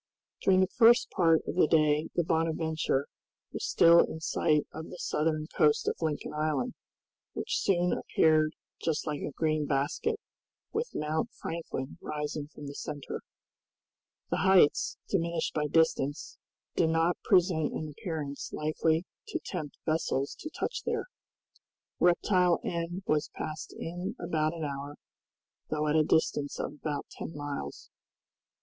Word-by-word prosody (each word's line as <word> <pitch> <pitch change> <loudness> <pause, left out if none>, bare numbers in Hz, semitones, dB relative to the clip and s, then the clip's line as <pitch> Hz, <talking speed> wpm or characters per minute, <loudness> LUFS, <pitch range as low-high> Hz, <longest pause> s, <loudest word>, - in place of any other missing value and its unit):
During 190 -1 +4
the 185 - +1
first 235 0 +6
part 165 -3 +4
of - - -3
the 180 - +4
day 155 -1 +3
the 175 - +2
"Bonadventure" 160 -3 0 0.5
was - - -4
still 170 0 +7
in 160 - +1
sight 155 -1 +1
of 160 +1 -7
the - - -8
southern 155 -2 0
coast 150 -1 +3
of - - +1
Lincoln 155 -3 -2
Island, 150 -4 0 0.6
which - - -1
soon 180 -2 +2
appeared 155 -1 +3 0.3
just 160 -2 -1
like 150 -2 -3
a - - -2
green 155 0 0
basket, 150 - 0 0.5
with 460 +3 -1
Mount 155 +1 -1
Franklin 165 -3 -5
rising 150 -1 -4
from 150 -1 -11
the 140 - -6
center. 145 -1 -5 1.1
The - - +1
heights, 190 -6 +4
diminished 170 -3 0
by 150 -1 0
distance, 150 -2 +1 0.4
did 160 - +3
not 165 +2 +2
present 175 -5 +3
an 155 - -3
appearance 150 -2 -5
likely 160 +2 0 0.2
to 365 -6 -2
tempt 155 -6 -5
vessels 155 -4 0
to 310 - -6
touch - - -3
there. - - -1 0.9
Reptile 180 0 +4
End 170 +2 -3
was 150 0 +1
passed 155 0 -5
in 180 +6 -4
about 160 -2 0
an 165 - -5
hour, 140 0 -4 0.7
though 155 0 0
at 150 - +2
a 155 - +6
distance 145 -2 +1
of - - -3
about 150 -1 -4
ten 160 - -7
miles. 145 -1 -6
160 Hz, 145 wpm, -30 LUFS, 150-170 Hz, 1.1 s, still